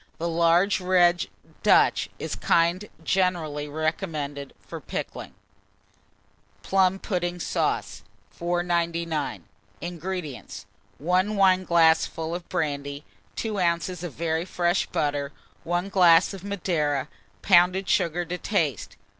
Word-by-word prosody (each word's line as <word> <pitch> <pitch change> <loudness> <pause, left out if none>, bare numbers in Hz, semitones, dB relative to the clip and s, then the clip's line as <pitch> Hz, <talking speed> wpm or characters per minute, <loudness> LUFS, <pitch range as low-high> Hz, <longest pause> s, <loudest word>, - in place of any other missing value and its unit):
The 170 - -2
large 170 +4 +3
red 180 -1 +3 0.3
Dutch - - +4
is - - -6
the - - -4
kind 170 +5 +2
generally 165 -6 0
recommended 155 -2 -3
for - - -9
pickling. - - -6 1.3
PLUM 190 - +2
PUDDING 180 -3 -3
SAUCE. - - -1 0.3
499. 170 - -1 0.4
INGREDIENTS. 175 -4 -6 0.3
1 185 +6 +1
wineglassful 170 -4 +3
of 175 0 -6
brandy, 140 -1 -3 0.3
2 215 -4 -2
oz. 170 0 0
of 175 - -5
very 160 0 -1
fresh 175 0 0
butter, 145 -1 -1 0.3
1 175 +3 -1
glass 175 -2 +5
of 190 -2 -9
Madeira, 165 -8 -1 0.4
pounded 185 +1 +4
sugar 175 +1 +1
to 180 +1 -5
taste. 160 - -1
170 Hz, 105 wpm, -25 LUFS, 160-185 Hz, 1.3 s, glass